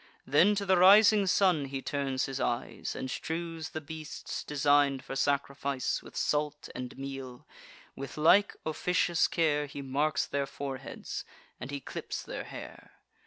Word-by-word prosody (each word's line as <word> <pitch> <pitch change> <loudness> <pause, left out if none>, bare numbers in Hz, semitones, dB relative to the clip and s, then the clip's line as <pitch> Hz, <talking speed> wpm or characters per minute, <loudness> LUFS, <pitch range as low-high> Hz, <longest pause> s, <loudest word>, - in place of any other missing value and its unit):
Then 210 +1 +4
to 200 0 -2
the 190 -1 +4
rising 200 +2 +7
sun 180 -6 +3
he 135 0 -4
turns 135 -3 -1
his 135 0 -4
eyes, 120 0 -2
And - - -4
strews 165 -1 -4
the 155 - -5
beasts, 155 0 -6
design'd 145 -2 +2
for 135 - -6
sacrifice, 140 -1 0
With - - -11
salt 150 0 -1
and 125 0 -6
meal: 135 -2 -7 0.5
with 135 0 -7
like 185 +7 +5
officious 175 +2 +1
care 150 -3 +1
He 140 0 -7
marks 140 +3 0
their 140 -1 -2
foreheads, 135 -1 -6 0.4
and 125 - -6
he 140 0 -4
clips - - -6
their - - -6
hair. - - -10
145 Hz, 150 wpm, -30 LUFS, 135-165 Hz, 0.5 s, rising